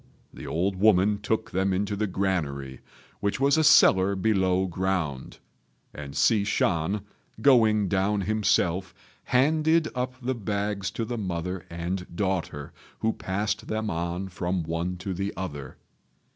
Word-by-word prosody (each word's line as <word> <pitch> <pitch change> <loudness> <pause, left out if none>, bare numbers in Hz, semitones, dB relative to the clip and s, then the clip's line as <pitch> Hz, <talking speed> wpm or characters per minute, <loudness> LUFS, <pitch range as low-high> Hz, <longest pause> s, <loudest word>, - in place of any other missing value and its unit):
The - - -9
old 95 +3 -1
woman 100 0 +4
took 110 +1 -1
them 95 +1 +1
into 100 +2 -1
the 105 +1 -1
granary, 75 -9 -2 0.4
which 100 +3 -1
was 140 +2 +4
a 160 - +3
cellar 95 -8 +6
below 95 -2 +2
ground, 90 -7 -2 0.6
and 70 -1 -8
Hsi 110 -4 +3
Shan, 95 -1 0 0.4
going 110 -5 +4
down 100 +2 +1
himself, 95 -3 0 0.3
handed 155 +4 +3
up 125 0 -3
the 130 0 -2
bags 100 -3 -2
to 115 - -4
the 120 0 -4
mother 90 -1 -4
and 90 +2 -4
daughter, 90 -7 -2 0.3
who 110 0 +1
passed 105 +2 -3
them 110 0 -2
on 85 +3 -3
from 90 0 -2
one 85 +3 -3
to 95 +1 -4
the 95 +3 -3
other. 75 -8 -6
95 Hz, 140 wpm, -26 LUFS, 90-105 Hz, 0.6 s, cellar